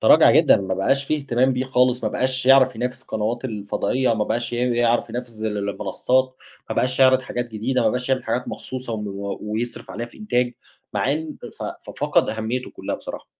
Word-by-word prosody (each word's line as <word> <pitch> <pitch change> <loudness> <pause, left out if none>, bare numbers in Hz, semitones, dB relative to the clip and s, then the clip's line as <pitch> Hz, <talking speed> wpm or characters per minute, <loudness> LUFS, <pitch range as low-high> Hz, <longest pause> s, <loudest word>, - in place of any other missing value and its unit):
ترَاجَع - - +7
جدًا - - +6
ما 95 -1 -2
بقاش 135 +9 +1
في 155 - 0
إهتمام 130 -2 +1
بيه 125 +1 -1
خالص 125 -1 +2
ما - - +1
بقاش 130 0 -1
يعرف 130 -2 +6
ينافس 125 +2 -3
القنوات 110 +4 -2
الفضائية، 115 +2 0
ما 105 -1 0
بقاش 120 +2 -2
ي 120 - -1 0.2
يعرف 120 0 +2
ينافس 120 -3 -6
ال 110 -1 -1
المنصات، 130 +6 0 0.3
ما - - -1
بقاش 130 +1 +1
يعرِض 130 0 +6
حاجات 120 -1 -4
جديدة 120 +4 0
ما - - +4
بقاش 125 +1 -2
يعمِل 130 -1 +1
حاجات 125 - -2
مخصوصة 130 -2 -6
وم 105 -1 -3 0.4
ويصرِف 110 +3 -4
عليها 120 +2 -4
في - - -17
إنتاج 125 - 0 0.4
مع 140 - +1
إن 155 0 -4 0.2
ف - - -6
ففقد - - +1
أهميته 110 +3 -3
كلها - - -4
بصراحة. - - -8
125 Hz, 195 wpm, -22 LUFS, 110-130 Hz, 0.4 s, ترَاجَع